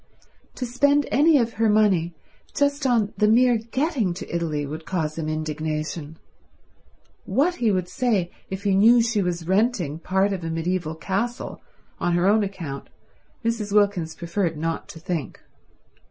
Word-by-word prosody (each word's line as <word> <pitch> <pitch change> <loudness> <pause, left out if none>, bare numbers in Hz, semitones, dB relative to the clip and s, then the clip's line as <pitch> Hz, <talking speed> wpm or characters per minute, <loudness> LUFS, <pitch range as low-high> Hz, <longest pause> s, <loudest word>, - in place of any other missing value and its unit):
To 255 - -3
spend 285 +4 +2
any 300 +2 +5
of 235 -3 0
her 225 - +4
money 190 -6 +3 0.4
just 285 0 +1
on 225 -5 +2
the 210 - +3
mere 240 +1 +4
getting 235 - -1
to 170 - -6
Italy 155 -4 -1
would 155 +3 -6
cause 160 -4 -2
him 160 -1 -3
indignation; 155 0 -3 1.1
what 285 - +1
he 230 -3 +2
would 185 -2 0
say 195 -3 0 0.2
if 190 +1 -5
he 200 -2 +2
knew 230 +5 +6
she 225 -3 +1
was 175 -2 -2
renting 190 - +1
part 190 +3 +1
of 185 -3 -5
a 165 - -3
mediaeval 165 0 -2
castle 200 +9 -3 0.4
on 175 - 0
her 175 +1 +2
own 215 +2 +4
account 170 -9 -6 0.6
Mrs. 225 -3 -1
Wilkins 200 -6 +2
preferred 170 -1 -2
not 165 +1 -3
to 160 - -10
think. 165 -3 -4
190 Hz, 155 wpm, -24 LUFS, 165-230 Hz, 1.1 s, knew